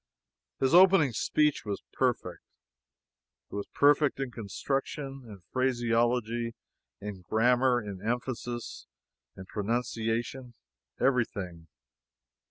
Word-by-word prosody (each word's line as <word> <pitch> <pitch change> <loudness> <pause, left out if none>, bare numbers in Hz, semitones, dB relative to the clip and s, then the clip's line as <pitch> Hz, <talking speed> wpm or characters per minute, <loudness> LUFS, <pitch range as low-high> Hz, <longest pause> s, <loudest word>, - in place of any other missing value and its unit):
His 135 +3 +2
opening 180 -6 +7
speech 150 +6 +1
was 105 -2 -4
perfect. - - -1 1.1
It - - -6
was 100 - -3
perfect 145 0 +3
in 135 -2 -2
construction, 135 +5 -3
in 100 -4 -11
phraseology, 120 -2 +1 0.4
in 100 -2 -7
grammar, 120 +6 +3
in 100 -4 -7
emphasis, 120 - -4 0.5
in 95 - -8
pronunciation 115 +3 -2 0.4
everything. 100 -10 0
120 Hz, 90 wpm, -29 LUFS, 105-130 Hz, 1.1 s, opening